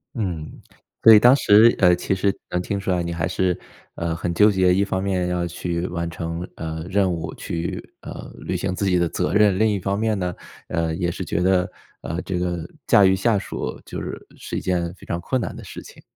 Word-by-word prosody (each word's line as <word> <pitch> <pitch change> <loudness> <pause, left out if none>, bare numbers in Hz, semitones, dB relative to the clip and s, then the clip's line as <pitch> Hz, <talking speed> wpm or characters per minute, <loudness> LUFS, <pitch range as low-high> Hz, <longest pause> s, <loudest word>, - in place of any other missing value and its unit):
嗯， 90 -9 -4 0.4
所 115 - +10
以 105 - +9
当 125 +4 +7
时 110 -2 +6
呃， 90 -2 +6
其 90 +2 -1
实 100 +1 +1
能 90 - -1
听 100 +2 -3
出 95 - -5
来 90 -2 +1
你 85 0 -3
还 85 0 -1
是， 90 -2 0 0.4
呃， 85 -1 -2
很 85 +1 -2
纠 105 +5 +5
结。 95 -2 +3
一 95 +2 +3
方 95 -1 -2
面 95 -2 0
要 90 -1 -1
去 85 0 -3
完 85 -1 -3
成， 85 +1 -5
呃， 80 0 -5
任 95 -1 +2
务， 80 -1 -5
去， 85 0 -5
呃， - - -8
履 - - -3
行 90 - -2
自 100 - -2
己 90 -1 +3
的 85 -1 +2
责 - - -2
任。 105 -2 +4
另 110 0 +4
一 105 -2 0
方 100 +2 -1
面 110 -1 +1
呢， 90 -2 -2 0.3
呃， 80 -2 -1
也 85 0 -1
是 95 - -5
觉 90 - -1
得， 90 0 +2 0.3
呃， 85 +2 -4
这 90 -2 -2
个 90 -2 -2 0.2
驾 100 - +6
驭 95 0 +5
下 105 +3 +2
属 - - -5
就 - - -6
是 - - -7
是 - - -6
一 - - 0
件 85 -2 -1
非 90 - -15
常 85 - -3
困 130 +8 -1
难 - - -4
的 - - -9
事 - - -9
情。 - - -14
90 Hz, 250 characters per minute, -22 LUFS, 85-100 Hz, 0.4 s, 所